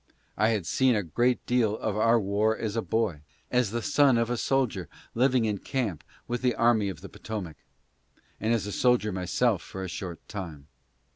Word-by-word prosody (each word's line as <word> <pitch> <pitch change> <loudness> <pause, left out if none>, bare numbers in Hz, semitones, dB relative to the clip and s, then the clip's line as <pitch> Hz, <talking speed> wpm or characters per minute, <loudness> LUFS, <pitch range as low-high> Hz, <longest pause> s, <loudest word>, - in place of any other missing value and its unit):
I 110 +2 +3
had 105 -6 0
seen 130 +4 +3
a 105 - 0
great 120 +9 0
deal 115 -4 +2
of 110 -2 -2
our 115 +2 +4
war 105 +2 +1
as 110 -1 -3
a 115 - +1
boy, 110 -9 -1 0.3
as 125 -4 +2
the 115 +2 -3
son 145 -4 +4
of 115 +1 0
a - - +1
soldier 120 - 0 0.2
living 125 -1 +3
in 105 -2 -1
camp 110 - -3 0.2
with 120 0 -2
the 125 -1 +1
army 115 -4 +3
of 85 -4 -7
the 100 - -9
Potomac, 95 -9 -6 0.8
and 110 +2 0
as 115 -4 +1
a 105 - -4
soldier 125 -2 +2
myself 95 +2 +1
for 95 +4 -7
a - - -3
short 85 +1 -7
time. 85 -8 -7
110 Hz, 195 wpm, -27 LUFS, 95-120 Hz, 0.8 s, our